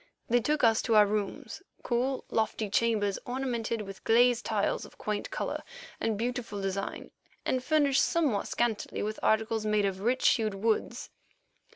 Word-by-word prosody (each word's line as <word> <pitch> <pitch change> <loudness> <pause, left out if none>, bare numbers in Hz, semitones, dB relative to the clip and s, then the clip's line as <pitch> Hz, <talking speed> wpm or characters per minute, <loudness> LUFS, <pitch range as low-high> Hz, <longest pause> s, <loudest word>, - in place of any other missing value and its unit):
They 245 +1 +4
took 300 +4 0
us 225 -1 +5
to 230 - +1
our 210 -1 +8
rooms—cool, 235 +5 -3
lofty 220 -2 -1
chambers 210 -3 +1
ornamented 240 -3 -2
with 195 -1 -10
glazed 240 +1 +4
tiles 205 -2 0
of - - -13
quaint 210 -1 -3
colour - - -3 0.4
and 220 -2 -1
beautiful 235 -2 -3
design, 195 0 -4 0.3
and 255 -1 0
furnished 285 -1 +3
somewhat 295 -12 +1
scantily 235 -3 -1
with 215 +1 -3
articles 220 0 +1
made 210 -1 +2
of 190 -1 -2
rich 245 +6 +2
hued 215 -3 +1
woods. 220 +3 -1
225 Hz, 150 wpm, -29 LUFS, 210-245 Hz, 0.4 s, our